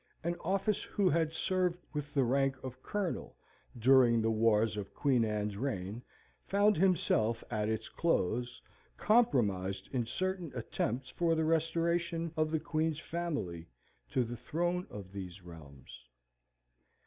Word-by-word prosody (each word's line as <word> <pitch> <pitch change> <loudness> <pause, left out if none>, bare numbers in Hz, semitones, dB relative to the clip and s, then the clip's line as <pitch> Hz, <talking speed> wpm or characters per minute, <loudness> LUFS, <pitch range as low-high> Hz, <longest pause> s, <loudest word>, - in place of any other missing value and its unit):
an 170 +1 0
office 195 +2 0
who 200 -3 +1
had 160 0 +2
served 180 +1 0 0.2
with 145 -1 -4
the 135 - +4
rank 135 +2 +2
of 130 -1 -7
Colonel 205 -4 -3 0.4
during 120 -1 +5
the 110 0 +1
wars 110 -1 +3
of 100 -2 -6
Queen 130 -5 +3
Anne's 105 -2 -1
reign, 105 -3 -3 0.5
found 205 +1 +4
himself, 140 - +2
at 105 -1 0
its 110 0 -2
close, 120 - 0 0.4
compromised 100 - +2
in 120 -3 0
certain 185 +3 -2
attempts 125 +2 -2
for 170 -1 +1
the 160 0 +1
restoration 165 +1 0
of 155 -1 +1
the 160 0 0
Queen's 155 -1 -1
family 145 - -4 0.4
to 130 - +1
the 120 +1 -5
throne 175 +9 -2
of 100 -2 -9
these 95 -2 -7
realms. 70 -8 -12
135 Hz, 135 wpm, -33 LUFS, 110-170 Hz, 0.5 s, during